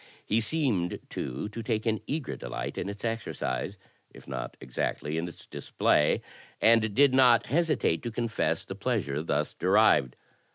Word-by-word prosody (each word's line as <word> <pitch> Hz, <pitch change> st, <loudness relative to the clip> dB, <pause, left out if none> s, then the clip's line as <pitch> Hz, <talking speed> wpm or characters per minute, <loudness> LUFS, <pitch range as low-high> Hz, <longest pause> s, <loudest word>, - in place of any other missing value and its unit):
He 110 Hz, +2 st, +2 dB
seemed, 115 Hz, -, 0 dB
too, 65 Hz, +9 st, -4 dB
to 115 Hz, +2 st, -6 dB
take 110 Hz, -1 st, -1 dB
an 110 Hz, -3 st, 0 dB
eager 150 Hz, -3 st, -3 dB
delight -, -, -5 dB
in -, -, -3 dB
its 100 Hz, +3 st, -6 dB
exercise 110 Hz, -, -3 dB, 0.2 s
— -, -, -29 dB
^if -, -, -14 dB
not -, -, -5 dB
exactly 70 Hz, +4 st, -3 dB
in 80 Hz, +2 st, -1 dB
its 85 Hz, -, -11 dB
display 75 Hz, -, +1 dB, 0.2 s
— -, -, -25 dB
^and 110 Hz, -2 st, +4 dB
did 140 Hz, -1 st, +5 dB
not 125 Hz, -3 st, +6 dB
hesi 160 Hz, +4 st, +1 dB
tate 80 Hz, -, +1 dB
to 120 Hz, -, -4 dB
confess 115 Hz, 0 st, -1 dB
the -, -, -6 dB
pleasure 70 Hz, +2 st, -1 dB
thus 75 Hz, -2 st, -1 dB
derived. 95 Hz, -, +3 dB
110 Hz, 170 wpm, -28 LUFS, 85-120 Hz, 0.2 s, not